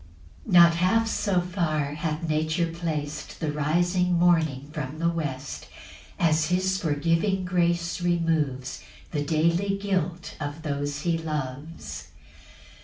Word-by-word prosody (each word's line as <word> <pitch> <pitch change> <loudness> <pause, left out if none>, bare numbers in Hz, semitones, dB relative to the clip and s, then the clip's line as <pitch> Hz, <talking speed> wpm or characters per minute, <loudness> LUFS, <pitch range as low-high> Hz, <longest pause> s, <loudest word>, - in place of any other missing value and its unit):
3 - - -4
Not 170 -1 +8
half 225 +6 +3
so 200 -4 +1
far 160 -5 -1
hath 155 +2 -3
nature 155 +2 +1
plac'd 155 -3 -4
The 155 -2 -1
rising 175 +5 +1
morning 160 -6 +2
from 150 -1 -4
the 170 +1 +1
west, 150 -4 -4 0.5
As 155 -2 +3
his 185 +2 +1
forgiving 165 +5 +1
grace 170 -1 0
removes 160 -7 0 0.3
The 150 - -1
daily 170 +6 +1
guilt 185 -4 -2
of 145 +1 -5
those 145 -1 -2
he 170 -1 0
loves. 150 0 -5
165 Hz, 120 wpm, -26 LUFS, 150-175 Hz, 0.5 s, Not